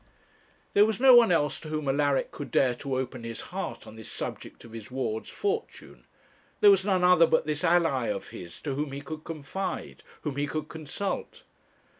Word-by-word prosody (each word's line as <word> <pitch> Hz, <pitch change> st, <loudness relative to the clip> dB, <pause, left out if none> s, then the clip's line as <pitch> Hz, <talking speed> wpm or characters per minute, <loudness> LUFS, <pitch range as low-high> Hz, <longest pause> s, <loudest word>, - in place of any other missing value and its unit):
There 205 Hz, +1 st, +6 dB
was 220 Hz, -1 st, -2 dB
no 265 Hz, 0 st, +8 dB
one 235 Hz, -4 st, +7 dB
else 150 Hz, -4 st, +1 dB
to 155 Hz, -, -9 dB
whom 155 Hz, -2 st, -3 dB
Alaric 140 Hz, 0 st, +1 dB
could 145 Hz, -, -7 dB
dare 130 Hz, -2 st, +3 dB
to 135 Hz, +2 st, -4 dB
open 130 Hz, -2 st, -4 dB
his 115 Hz, -1 st, -5 dB
heart -, -, -4 dB
on 110 Hz, -, -12 dB
this 110 Hz, -, -8 dB
subject -, -, -6 dB
of 115 Hz, -, -13 dB
his 115 Hz, -2 st, -9 dB
ward's 120 Hz, -4 st, -3 dB
fortune; 420 Hz, +2 st, -4 dB, 0.5 s
there 205 Hz, -, +8 dB
was 195 Hz, -1 st, +4 dB
none 190 Hz, -2 st, +1 dB
other 180 Hz, -2 st, +6 dB
but -, -, +2 dB
this 150 Hz, +2 st, -2 dB
ally 165 Hz, -8 st, +3 dB
of 100 Hz, -1 st, -3 dB
his 85 Hz, -1 st, -9 dB
to 145 Hz, -, -3 dB
whom 140 Hz, 0 st, -3 dB
he 140 Hz, -, -5 dB
could 155 Hz, +2 st, -7 dB
confide, 165 Hz, +4 st, -5 dB, 0.2 s
whom 145 Hz, -3 st, -3 dB
he 145 Hz, 0 st, 0 dB
could 155 Hz, +1 st, -4 dB
consult. 160 Hz, +5 st, -4 dB
150 Hz, 195 wpm, -28 LUFS, 130-180 Hz, 0.5 s, no